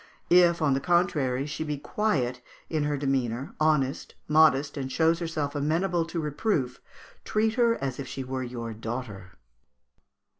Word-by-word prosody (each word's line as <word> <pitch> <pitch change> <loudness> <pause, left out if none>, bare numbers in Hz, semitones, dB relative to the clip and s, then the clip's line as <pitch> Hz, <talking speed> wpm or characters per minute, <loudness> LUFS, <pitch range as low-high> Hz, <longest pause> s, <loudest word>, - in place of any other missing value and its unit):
If, 170 -2 +5
on 145 -3 +3
the 135 - +1
contrary, 140 -5 +1
she 155 +1 -4
be 150 -2 -3
quiet 135 - -1 0.3
in 155 -2 0
her 145 -1 0
demeanour, 135 -2 -1
honest, 150 -3 +1
modest, 150 -2 +4
and 135 -2 -4
shows 165 +3 +2
herself 155 -4 -2
amenable 165 +4 0
to 165 +1 -4
reproof, 150 - -1 0.4
treat 220 +1 +1
her 235 -1 +3
as 135 - -4
if 135 - -5
she 135 - -5
were 130 0 -4
your 120 -2 -5
daughter. 110 -4 -6
145 Hz, 150 wpm, -27 LUFS, 130-165 Hz, 0.4 s, If